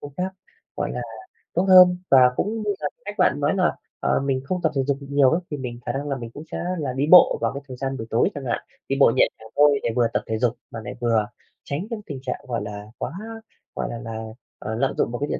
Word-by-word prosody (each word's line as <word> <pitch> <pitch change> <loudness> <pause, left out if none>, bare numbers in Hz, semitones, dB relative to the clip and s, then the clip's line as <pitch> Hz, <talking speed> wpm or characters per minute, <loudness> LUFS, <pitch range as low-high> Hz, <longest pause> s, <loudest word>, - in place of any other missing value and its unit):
cũng 145 - -9
khác, 185 +1 -2 0.4
gọi 145 - -2
là, 125 - -3 0.5
tốt 180 - +2
hơn. 180 -1 +8
Và 135 - +8 0.2
cũng 220 - -1
như 210 - -2
là 150 - -1 0.2
cách 205 0 -5
bạn 180 -6 +3
nói 145 +5 +1
là, 185 -2 +2 0.2
ờ, - - +1
mình 135 -1 0
không 180 +6 -2
tập 160 - +2
thể 135 - +2
dục 140 0 0
được 140 - -9
nhiều 140 -2 +5
ấy, 165 +3 +1
thì 150 - -2
mình 125 -3 -6
khả - - -1
năng 140 +2 -4
là 140 - -1
mình 115 -3 -7
cũng 145 - -9
sẽ - - -3 0.2
là 140 -4 -2
đi 135 +3 0
bộ 180 - +8
vào - - 0
cái 140 - -5
thời 130 -2 -8
gian 135 +1 -3
buổi 110 - -6
tối 115 - +3
chẳng 140 -2 -6
hạn, 120 - 0 0.3
đi 135 - +1
bộ 135 - +7
nhẹ - - +5
nhàng 110 - -13
thôi 145 -1 +5
để - - +1
vừa 120 -2 +3
tập - - 0
thể 110 - -1
dục 120 0 +1 0.2
mà 115 - -6
lại - - -6
vừa 115 -3 +2 0.4
tránh 150 +8 -4
những 230 -3 -4
tình 140 -3 -6
trạng, 130 - -3
gọi 120 -3 -2
là, 105 0 -7
quá, - - -4 0.6
gọi - - -2
là 120 - -5
là, 115 -1 -6 0.4
ờ, 110 - -4
lạm 135 +4 0
dụng - - +1
vào 120 - -4
cái 145 - -1
điện - - -2
135 Hz, 275 wpm, -23 LUFS, 120-150 Hz, 0.6 s, hơn